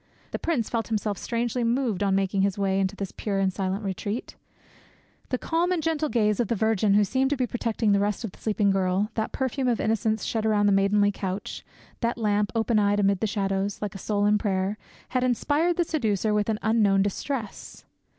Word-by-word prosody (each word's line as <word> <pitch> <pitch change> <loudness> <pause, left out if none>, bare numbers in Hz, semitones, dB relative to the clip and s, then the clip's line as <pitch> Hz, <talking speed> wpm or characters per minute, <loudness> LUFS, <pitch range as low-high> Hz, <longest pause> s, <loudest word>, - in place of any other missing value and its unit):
The - - -3
prince 270 -10 0
felt 230 -2 -2
himself 210 -3 -2
strangely 240 +1 -1
moved 235 -4 0
on 195 -1 +2
making 195 0 +1
his 195 0 +1
way 195 -1 +1
into 195 +1 0
this 200 -2 -5
pure 200 -2 -3
and 190 -1 +1
silent 195 +2 -2
retreat. 200 +4 -4 0.9
The 255 - 0
calm 335 +6 0
and 345 -3 0
gentle 315 -2 0
gaze 210 -5 +1
of 240 - +1
the 230 - 0
Virgin 215 -1 +2
who 210 - +5
seemed 260 +6 +1
to 290 - 0
be 255 - +1
protecting 230 -2 -1
the 200 - +4
rest 205 +3 -1
of 220 - -4
the - - -19
sleeping 210 -2 +1
girl, 195 +2 0
that 220 -1 -2
perfume 260 0 -1
of 240 -2 +1
innocence 220 0 0
shed 225 -2 -1
around 210 -2 +2
the 205 - +4
maidenly 200 +1 +3
couch, 195 0 -5 0.4
that 235 0 -1
lamp, 210 -3 +1
open 225 -1 +2
eyed 205 0 +2
amid 200 -1 +2
the 220 - 0
shadows, 195 -1 -1
like 210 -2 -4
a 195 - -8
soul 205 0 0
in 210 0 +3
prayer, 195 -1 -1 0.3
had 255 -1 0
inspired 290 +7 +1
the 350 - +3
seducer 220 - 0
with 210 0 +1
an 220 - +1
unknown 210 -3 +3
distress. 215 +3 -5
210 Hz, 210 wpm, -26 LUFS, 200-235 Hz, 0.9 s, who